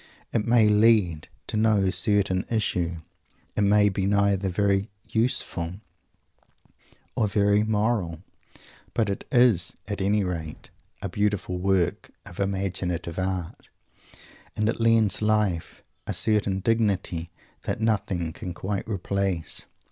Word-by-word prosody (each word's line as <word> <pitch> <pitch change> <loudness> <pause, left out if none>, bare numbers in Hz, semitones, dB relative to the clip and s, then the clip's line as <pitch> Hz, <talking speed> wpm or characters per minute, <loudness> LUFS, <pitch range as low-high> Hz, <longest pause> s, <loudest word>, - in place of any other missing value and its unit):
It 110 -1 0
may 115 -2 +5
lead 105 -7 +3 0.2
to - - -5
no 105 -3 +3
certain 100 -2 +3
issue. 90 -7 -1 0.5
It - - 0
may 105 0 +4
be 95 -1 0
neither 100 -1 +2
very 100 +2 +1 0.2
"useful" 95 -7 -1 1.4
or 110 - +2
very 100 +1 +3
"moral." 105 -6 -1 0.7
But 110 -3 +1
it 100 - -5
is, 120 -9 +3
at 100 -1 -3
any 100 +1 +2
rate, 85 -4 -5 0.3
a - - -1
beautiful 105 -3 -1
work 95 -2 0 0.2
of 85 - -11
imaginative 95 -3 -2
art, 95 -2 -4 0.9
and 105 - 0
it 115 - -1
lends 115 -3 +3
life 105 -6 0 0.2
a - - -2
certain 100 -3 +1
dignity 95 -7 0 0.4
that - - -2
nothing 95 -7 -1
can 90 -5 -7
quite 95 +3 -3
replace. 95 -3 -2
100 Hz, 120 wpm, -25 LUFS, 90-105 Hz, 1.4 s, may